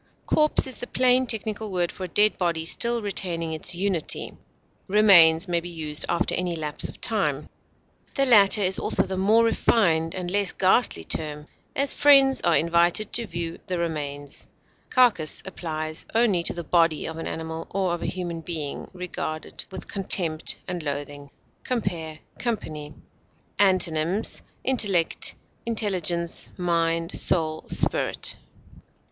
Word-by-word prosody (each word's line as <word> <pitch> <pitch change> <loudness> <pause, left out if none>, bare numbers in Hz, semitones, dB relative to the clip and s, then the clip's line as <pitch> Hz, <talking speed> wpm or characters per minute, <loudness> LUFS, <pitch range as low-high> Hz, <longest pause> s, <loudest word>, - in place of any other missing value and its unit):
Corpse 305 0 +3
is 260 -2 -1
the 245 - -5
plain 255 0 +3
technical 220 -2 -3
word 175 -2 -1
for 185 - -7
a - - -6
dead 210 +4 +3
body 170 -3 -1
still 235 +6 0
retaining 170 -5 -2
its 160 +2 0
unity; 185 -3 -1 0.5
remains 185 -4 +6
may 175 -1 +1
be 175 +1 -8
used 155 -3 -3
after 170 +1 0
any 180 -1 -1
lapse 150 -2 -5
of - - -13
time; - - -1 0.7
the 275 - +2
latter 210 -4 +6
is 190 0 +2
also - - +1
the 190 - -4
more 210 +5 +3
refined 170 -8 +1
and 180 -1 -4
less 200 -1 0
ghastly 190 - +2
term; 150 - -2 0.3
as, 280 0 +2
friends 275 -2 +5
are 170 - +3
invited 170 +5 +1
to 235 -1 0
view 170 -1 -5
the 180 - -2
remains. 145 -4 -4 0.4
Carcass 230 -12 +2
applies 155 -4 -5
only 220 -7 +3
to - - 0
the 170 - -5
body 165 -2 +1
of 160 - -6
an 165 - -5
animal, 160 0 -6
or 190 -2 -1
of 175 - -4
a - - -3
human 175 -2 -4
being 155 -4 -5
regarded 175 -3 -6
with 190 - -8
contempt 175 -5 +2
and 180 -2 -4
loathing. 145 -1 -6 0.3
Compare 175 -10 -3 0.2
COMPANY. 155 -11 -4 0.6
Antonyms: 185 0 +1 0.2
intellect, 205 -10 +1 0.3
intelligence, 180 -6 -1
mind, 165 -1 0
soul, 155 -2 +1
spirit. - - 0
175 Hz, 140 wpm, -24 LUFS, 160-205 Hz, 0.7 s, remains